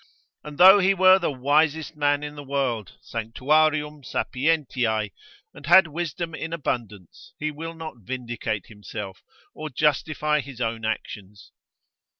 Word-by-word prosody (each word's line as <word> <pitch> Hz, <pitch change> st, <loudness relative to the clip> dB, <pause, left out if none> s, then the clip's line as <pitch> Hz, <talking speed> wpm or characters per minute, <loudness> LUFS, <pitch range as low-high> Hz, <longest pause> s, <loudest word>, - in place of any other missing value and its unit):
And 150 Hz, -1 st, -9 dB
though 190 Hz, +3 st, +9 dB
he 195 Hz, +1 st, +3 dB
were 185 Hz, 0 st, +6 dB
the 175 Hz, -, -1 dB
wisest 150 Hz, +4 st, +1 dB
man 145 Hz, -1 st, +1 dB
in 150 Hz, 0 st, -6 dB
the 145 Hz, -1 st, -9 dB
world, 130 Hz, -, -2 dB
sanctuarium 150 Hz, +6 st, 0 dB
sapientiae, 125 Hz, -8 st, -1 dB, 0.4 s
and 140 Hz, -, -12 dB
had 190 Hz, +3 st, +8 dB
wisdom 165 Hz, +1 st, -4 dB
in 160 Hz, 0 st, -5 dB
abundance, 110 Hz, -, -5 dB
he 155 Hz, 0 st, -2 dB
will 165 Hz, +2 st, -7 dB
not 160 Hz, -5 st, -8 dB
vindicate 120 Hz, -3 st, -4 dB
himself, 105 Hz, -2 st, -8 dB, 0.3 s
or 155 Hz, 0 st, -6 dB
justify 150 Hz, +2 st, +1 dB
his 135 Hz, -4 st, -8 dB
own 115 Hz, -1 st, -2 dB
actions. 105 Hz, -2 st, -6 dB
145 Hz, 135 wpm, -24 LUFS, 115-155 Hz, 0.4 s, though